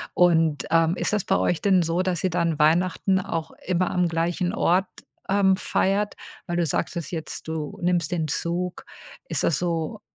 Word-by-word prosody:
Und, 165 -4 +3
ähm, 165 +1 +3
ist - - -1
das 210 -3 +1
bei 195 - +2
euch 175 - 0
denn 190 -3 +4
so, 165 +2 0
dass 180 -3 -1
ihr 185 - +2
dann 170 -2 0
Weihnachten 180 +4 +2
auch 165 -3 -4
immer 180 0 0
am 180 -1 +2
gleichen 170 +2 -1
Ort, 185 +2 +2 0.4
ähm, 190 -1 +3
feiert? 200 +3 0 0.3
Weil, 175 -1 -2
du 175 - +2
sagtest 165 +1 -2
jetzt, 160 -2 -6
du 160 -2 -4
nimmst 175 -3 +1
den 165 -3 -1
Zug. 175 +4 -3 0.4
Ist - - -1
das 155 - +2
so, 170 +4 -2
175 Hz, 175 wpm, -24 LUFS, 165-185 Hz, 0.4 s, denn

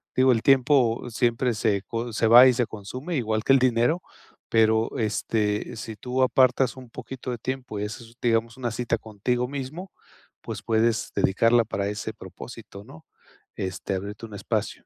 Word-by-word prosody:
Digo, 130 0 +5
el 115 -2 +1
tiempo 130 -3 +3
siempre 120 +1 +1
se 105 -2 +1
co 115 +1 -4
se 110 +2 +1
va 120 +3 +9
y 130 - +5
se 120 -1 0
consume 125 - -6
igual 110 -5 -1
que 135 - +4
el 135 - +5
dinero. 125 +6 +2 0.5
Pero, 110 0 +2
este 105 0 -1
si 110 0 -7
tú 125 +4 -1
apartas 130 0 +3
un 130 -2 -12
poquito 130 +2 -8
de 120 - -3
tiempo 130 -2 -5
y 105 - -2
haces, 115 +2 -9
digamos 115 -1 0
una 120 -3 -3
cita 115 +1 -1
contigo 115 +4 -2
mismo, 145 +7 -6 0.5
pues, - - -7
puedes 110 0 +1
dedicarla 115 +4 +3
para 100 -2 -2
ese 105 +2 -4
propósito, 100 +1 -11
¿no? 145 +8 -15 0.5
Este 95 +1 -4
abrirte 100 +4 -5
un 110 - -12
espacio. 100 - -3
115 Hz, 170 wpm, -25 LUFS, 110-130 Hz, 0.5 s, va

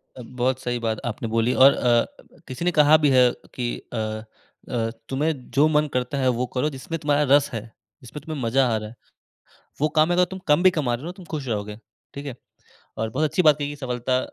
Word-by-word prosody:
अ, 125 - -9
बहुत 130 +2 -1
सही 120 -1 -2
बात 110 -2 -2
आपने 115 0 -4
बोली 115 +2 +1
और 135 +1 +7
अ, 120 -1 +2 0.4
किसी 130 +7 -5
ने 180 - +3
कहा 155 -1 +6
भी 150 -2 +2
है 125 -2 +5 0.2
कि 120 -2 -2 0.3
अ - - -3 0.8
अ, 115 -1 0 0.2
तुम्हें 140 -1 -2
जो 145 +3 +5
मन 150 0 +3
करता 125 +2 -1
है 130 - +1
वो 125 - 0
करो 130 +4 0
जिसमे 140 +4 -6
तुम्हारा 150 -1 +1
रस 145 0 +2
है, 115 - -2 0.4
जिसमे 125 +4 -9
तुम्हें 155 -1 -6
मज़ा 130 +3 +2
आ 115 - +1
रहा 105 0 -6
है। 115 - -15 0.9
वो 155 - +3
काम 155 - +5
में 175 - +1
अगर 180 - +5
तुम 190 - -5
कम 150 +4 +4
भी 185 - +7
कमा 140 -8 -1
रहे 120 - -5
हो 160 - -7
ना, 175 - -5
तुम 190 - -12
ख़ुश 150 -4 -4
रहोगे, 105 -1 -3 0.4
ठीक 140 +1 -7
है? 130 - -5 0.6
और 110 0 -2
बहुत 145 +7 0
अच्छी 180 +4 +1
बात 150 -2 +5
की 145 0 -3
सफलता 125 -1 -1
130 Hz, 230 wpm, -23 LUFS, 120-150 Hz, 0.9 s, और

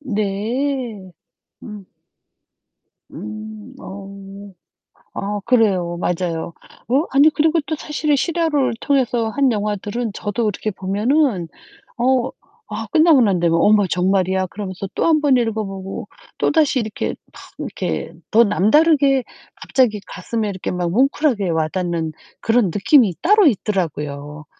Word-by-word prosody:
네. 220 -2 -2 0.5
음. 210 -3 -9 1.3
음. 215 +3 -8
어. 195 0 -9 1.1
아 205 +1 -3
그래요. 195 -8 +2
맞아요. 170 -2 -2 0.3
어 270 +7 +2
아니요. 285 +3 +5
그리고 320 +2 +3
또 315 - -2
사실은 300 0 -1
실화를 305 -3 0
통해서 245 -5 +1
한 270 +3 +2
영화들은 210 +2 -2
저도 215 +2 -2
이렇게 215 +2 -3
보면은 205 - 0 0.5
어 255 +1 +1 0.4
아 220 +1 -4
끝나고 315 -4 +5
난 195 -6 +2
다음에 170 -1 +2
'어머 205 +2 +4
정말이야?' 185 +1 +1
그러면서 195 -1 -6
또 - - 0
1 315 -2 +3
번 285 -3 +4
읽어 225 -3 -1
보고 195 0 -7 0.3
또다시 300 -5 +2
이렇게 215 -2 -3 0.2
막 - - -13 0.2
이렇게 - - -4 0.2
더 230 +2 +6
남다르게 275 - +3 0.3
갑자기 240 -6 +1
가슴에 215 +3 -4
이렇게 190 -2 -5
막 175 -1 -2
뭉클하게 255 - +1
와닿는 165 0 -1 0.3
그런 230 0 +3
느낌이 205 - +3
따로 410 -1 +5
있더라고요. 150 - -2
215 Hz, 270 characters per minute, -20 LUFS, 190-265 Hz, 1.3 s, 더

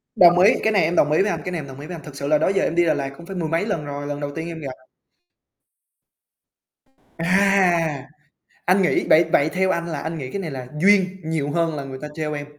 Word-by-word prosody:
Đồng 175 -1 +6
ý, 200 +6 +6
cái 220 - +2
này 195 - +4
em 165 +2 0
đồng 150 - +3
ý 155 - +3
với 205 - +1
anh, 165 -3 -3
cái 180 - -3
này 175 - -3
em 145 - -7
đồng 135 0 -11
ý 145 - -8
với 175 - -6
anh, 160 - -11
thực 145 -1 -11
sự 140 0 -5
là 150 - +4
đó 150 - +1
giờ 195 0 +1
em 165 - -1
đi 175 0 +3
Đà 160 - +3
Lạt 140 -2 -3
cũng 170 - -12
phải 190 +1 -8
mười 165 -3 -3
mấy 165 +4 0
lần 170 -9 -3
rồi, 145 0 -6
lần 145 0 -4
đầu 145 -1 -4
tiên 160 +1 -4
em 165 -1 -7
gặp. 140 -4 -6 2.5
À! 175 -5 +2 0.6
Anh 185 +2 +3
nghĩ 180 - +1
vậy 165 +2 +6
vậy 145 +2 +4
theo 190 0 +1
anh 170 -1 -2
là 155 -4 -4
anh 160 +1 -4
nghĩ 130 -4 -6
cái 200 - -4
này 165 - -5
là 130 -2 -7
duyên 190 -1 +4
nhiều 155 -3 -2
hơn 165 0 0
là 140 - -4
người 135 -1 -8
ta 150 - -5
trêu 155 -1 -3
em. 145 -1 -5
165 Hz, 270 wpm, -22 LUFS, 145-180 Hz, 2.5 s, Đồng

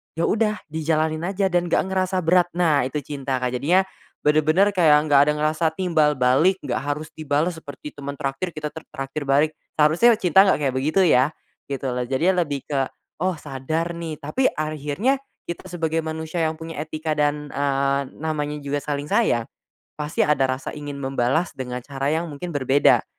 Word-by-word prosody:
ya 165 - -1
udah 215 -1 +1
dijalanin 155 +1 0
aja 195 +1 0
dan 175 0 +2
gak - - +2
ngerasa 185 -1 0
berat 175 +2 +4
nah 155 -7 +3
itu 150 +2 -3
cinta 135 -3 -3
Kak. 125 - +1
Jadinya, 180 +6 +4 0.4
benar-benar 155 +6 +4
kayak 155 -5 +4
gak 140 -1 +7
ada 150 - +3
ngerasa 155 +2 0
timbal 160 -5 +2
balik 135 +10 +3
gak - - -1 0.2
harus 155 +1 -8
dibalas 155 +3 0
seperti 145 -1 -9
teman 140 0 -6
traktir 135 +6 -3
kita 150 -1 -3
t - - -13 0.2
traktir 135 +2 -4
balik, 145 +3 +3 0.2
seharusnya 160 +11 +5
cinta 190 -1 +5
gak 190 - +2
kayak 135 -3 0
begitu 155 +8 +2
ya, 130 +5 +4 0.3
gitu 135 -1 -3
loh. 125 0 -2
Jadinya 170 +8 +2
lebih 145 -2 -4
ke, 135 -2 +1 0.4
oh, 185 - +2
sadar 155 +4 -3
nih 160 -2 -6
tapi 205 - -1
akhirnya 155 - -1 0.3
kita 170 +2 -5
sebagai 165 -2 -2
manusia 160 +1 -2
yang 155 - 0
punya 165 -1 -7
etika 155 0 -3
dan, 150 0 0
eee, 140 0 +1 0.2
namanya 150 -2 -2
juga 140 +1 -2
saling 145 0 -4
sayang, 120 -1 +2 0.4
pasti 150 0 -1
ada 135 -3 +2
rasa 130 +1 -3
ingin 145 -1 -6
membalas 135 +4 0
dengan 125 -1 -6
cara 140 0 -3
yang 160 +3 +1
mungkin 145 +5 -6
berbeda, 140 0 +4
150 Hz, 175 wpm, -23 LUFS, 140-165 Hz, 0.4 s, gak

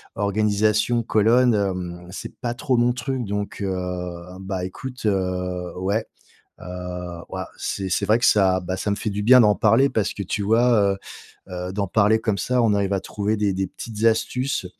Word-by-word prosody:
organisation 105 +3 +1
colonne, 115 +3 +3
hem, 90 -3 -3
c'est 95 - -8
pas 120 -2 -2
trop 130 0 0
mon 120 +1 +3
truc, 125 +1 -3
donc 100 0 -4
heu, 100 -1 -1 0.7
bah 95 -1 -4
écoute, 125 +7 -7
heu, 90 -3 -1
ouais, 100 +4 0 0.6
heu, - - -10 0.6
wouah, 95 -1 -5
c'est 95 -1 -3
c'est - - +1
vrai 110 +2 +4
que 120 - +2
ça, 95 -3 +4
bah, 90 +1 -4
ça 100 - -2
me 100 - 0
fait 105 +2 -3
du 100 +1 -3
bien 125 +4 +7
d'en 105 -3 +5
parler 115 +6 +4
parce 110 -4 -1
que 100 - -4
tu 100 - -2
vois? 110 -2 +3 0.6
Heu - - -9
heu, 90 0 -4
d'en 100 0 -1
parler 110 +3 +3
comme 110 -3 -1
ça, 125 +4 +1
on 110 -3 +3
arrive 100 -1 0
à 95 - 0
trouver 105 +2 -2
des 100 -2 0
des 95 0 -1
petites 110 +2 -6
astuces 115 0 +1
105 Hz, 190 wpm, -23 LUFS, 95-115 Hz, 0.7 s, bien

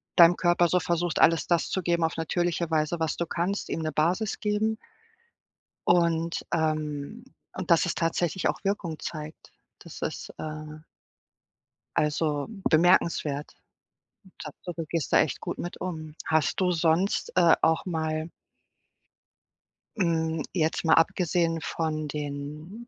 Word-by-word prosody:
deinem 170 -1 +8
Körper 175 -1 +3
so 180 - +2
versuchst, 170 0 -1
alles 165 0 +5
das 170 -2 +1
zu 190 - -1
geben 170 0 +1
auf 160 0 0
natürliche 170 0 -1
Weise, 160 +2 +1
was 160 -2 0
du 170 - -1
kannst 180 +5 -2
ihm 165 - -2
'ne 155 - -1
Basis 175 +8 0
geben. 215 +1 0 1.1
Und 170 -1 +2
ähm, 155 +5 -2 0.3
und 185 -2 -3
dass 170 +2 +5
es 175 - -2
tatsächlich 170 +1 0
auch - - -2
Wirkung 190 -5 -2
zeigt, 155 -1 -8 0.3
das - - -11
ist, - - -4
äh 155 0 -7 1.2
Also, 150 -1 0 0.2
bemerkenswert. 155 -3 +2 0.9
Tapfer, 175 - -7
du 165 -1 -4
gehst 165 -5 -2
da - - +7
echt - - -1
gut - - -4
mit 175 - -5
um. 155 -4 -5
Hast 160 +2 +1
du 180 -1 +2
sonst, 170 +3 +1
äh, 170 -2 +6
auch 160 +3 +2
mal 160 -2 -2 1.7
hm, 160 -3 0
jetzt 160 -1 0
mal 160 - +5
abgesehen 165 0 +2
von 155 -2 -2
den 150 - -6
165 Hz, 135 wpm, -27 LUFS, 155-175 Hz, 1.7 s, deinem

